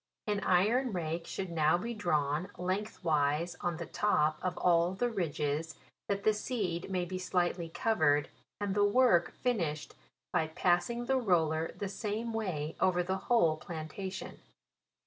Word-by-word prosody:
An 210 -1 0
iron 215 +8 +2
rake 165 -1 -3
should 190 -2 -4
now 160 0 +3
be 230 +6 -4
drawn 155 -4 0
lengthwise 175 -4 0
on 175 -2 -1
the 170 - -5
top 155 -4 +1
of 180 -1 -2
all 175 +1 +3
the 245 +4 0
ridges, 160 -4 -2 0.3
that 200 0 -1
the 215 - +4
seed 200 -6 -2
may 180 -2 -1
be 185 +1 -4
slightly 175 -2 0
covered, 160 - +2 0.3
and 205 -1 -1
the 205 0 +3
work 205 -5 +4
finish 170 - 0
ed - - -17 0.4
by 160 - +2
passing 180 +9 +1
the 265 +1 +2
roller 165 -8 +1
the 200 - -3
same 215 +3 -3
way 170 -9 -2
over 180 -1 +3
the 190 +2 -1
whole 170 -10 +4
plantation. 175 +4 -6
180 Hz, 150 wpm, -32 LUFS, 160-205 Hz, 0.4 s, the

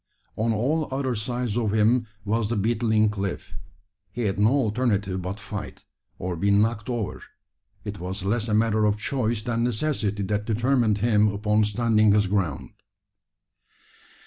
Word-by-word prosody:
On 115 +2 0
all 140 +9 0
other 130 -1 -1
sides 120 0 -2
of 110 -4 0
him 115 +2 +3 0.2
was 110 +1 0
the 120 - 0
beetling 110 0 +2
cliff. 95 -7 -4 0.6
He 120 - -4
had 100 -1 -1
no 105 +2 +5
alternative 105 -7 0
but 95 +4 -5
fight, 105 0 -7 0.3
or 90 0 -3
be 100 +5 0
"knocked 105 +2 +2
over." 120 -4 -3 0.6
It 105 -3 -6
was 95 +2 -5
less 110 +3 0
a 105 - +1
matter 110 -1 +2
of 105 0 +2
choice 115 -2 -1
than 115 0 -1
necessity 110 -4 -1
that 105 +1 -1
determined 115 -1 +2
him 105 -1 +3
upon 105 +1 +1
standing 110 -1 +3
his 105 -1 +3
ground. 95 -8 -2
110 Hz, 150 wpm, -25 LUFS, 105-120 Hz, 0.6 s, no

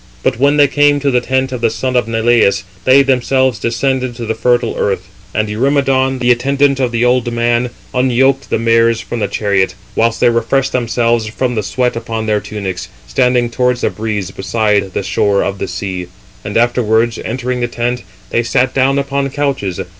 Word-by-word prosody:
But - - 0
when 140 +2 +3
they 145 -1 +6
came 145 +1 +3
to 140 -1 +1
the 125 -1 +2
tent 130 +1 -1
of 125 -2 -5
the 115 - +3
son 130 +3 -3
of 120 -2 +1
Neleus, 115 -3 +2 0.2
they 135 +2 +6
themselves 130 -2 +1
descended 130 +1 -1
to 120 -1 -6
the 110 - -1
fertile 120 +2 +1
earth, 95 -2 -1 0.2
and 110 +1 -1
Eurymedon, 135 +3 +1
the 125 -1 +2
attendant 140 +3 +2
of 125 -2 0
the 120 0 +1
old 125 -1 +1
man, 120 +1 +1 0.2
unyoked 130 +2 +2
the - - +1
mares 115 0 +2
from 120 - -5
the 105 - 0
chariot; 100 -1 0 0.2
whilst 115 0 +1
they 120 - +4
refreshed 120 +4 0
themselves 120 -2 0
from 125 +3 -2
the 110 - -1
sweat 125 +5 -1
upon 115 -1 -4
their 105 -1 +1
tunics, 95 -3 -5 0.2
380 - - -13
standing 125 -2 +2
towards 125 +1 0
the - - 0
breeze 105 -4 -3
beside 100 -1 -1
the - - -1
shore 100 -1 +1
of 100 0 -3
the - - -3
sea, 95 -1 -5 0.4
and 105 - -2
afterwards, 115 -1 +1
entering 125 +1 -3
the 120 - 0
tent, 120 +1 -2 0.3
they 120 - +2
sat 125 +2 0
down 135 +1 +2
upon 140 0 -1
couches. 135 -10 -2
120 Hz, 190 wpm, -15 LUFS, 110-130 Hz, 0.4 s, they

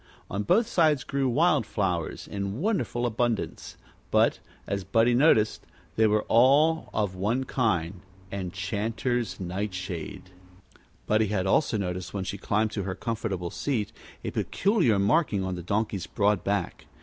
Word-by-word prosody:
On 100 - -1
both 190 - +3
sides 155 - +2
grew 135 -1 0
wild 150 +1 +3
flowers 90 -6 -2
in 100 +2 -4
wonderful 155 - 0
abundance, 120 -1 -2 0.3
but, - - +3 0.3
as 100 -1 -2
Buddie 115 +6 +3
noticed, 120 -5 +4 0.3
they 110 0 +4
were 105 0 +2
all 145 +7 +4
of 105 -3 -1
one 105 +8 0
kind 95 -9 -1 0.3
Enchanter's 100 +3 -2
Nightshade. 95 -2 -5 0.7
Buddie 110 0 +2
had 100 -2 -1
also 110 +4 +2
noticed, 90 -1 -4
when 100 - -2
she 95 +1 -5
climbed 105 +2 0
to 105 - -3
her 95 0 -3
comfortable 100 -6 -3
seat, 115 -8 -2 0.3
a - - -3
peculiar 190 - +1
marking 100 - +2
on 95 0 -2
the 90 - -5
Donkey's 100 +1 -2
broad 105 -2 +1
back. 100 +1 -2
105 Hz, 140 wpm, -27 LUFS, 95-120 Hz, 0.7 s, noticed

